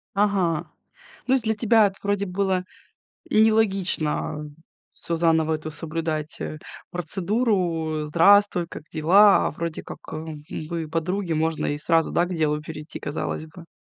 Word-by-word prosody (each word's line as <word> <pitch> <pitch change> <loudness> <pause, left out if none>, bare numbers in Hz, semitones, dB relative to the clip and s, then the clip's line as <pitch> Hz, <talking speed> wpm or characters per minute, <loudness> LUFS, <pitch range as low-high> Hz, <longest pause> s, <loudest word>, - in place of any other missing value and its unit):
Ага. 195 -6 +1 0.6
Ну 260 - +3
есть 250 - 0
для 220 0 +1
тебя 220 -1 +4
это 195 - -7
вроде 200 0 0
было 185 0 0 0.7
нелогично, 195 -9 +1
э, 160 +3 -22 0.3
всё 170 - -4
заново 160 -1 +2
эту 155 0 -6
соблюдать, 160 -1 -4
э, 155 - -5 0.3
процедуру. 175 -4 -1
"Здравствуй, 175 +2 +4
как - - -9
дела?" 195 +6 +5
А - - -3
вроде 165 +1 -5
как, - - -8
хм, 155 0 -6 0.3
вы 165 -2 -3
подруги, 170 +2 -1
можно 160 0 0
и 145 - -1
сразу, 165 +2 +1
да, 175 - +2
к 180 - -5
делу 150 -1 0
перейти, 155 0 -8
казалось 155 +1 -4
бы. 165 +1 -14
170 Hz, 150 wpm, -24 LUFS, 155-200 Hz, 0.7 s, дела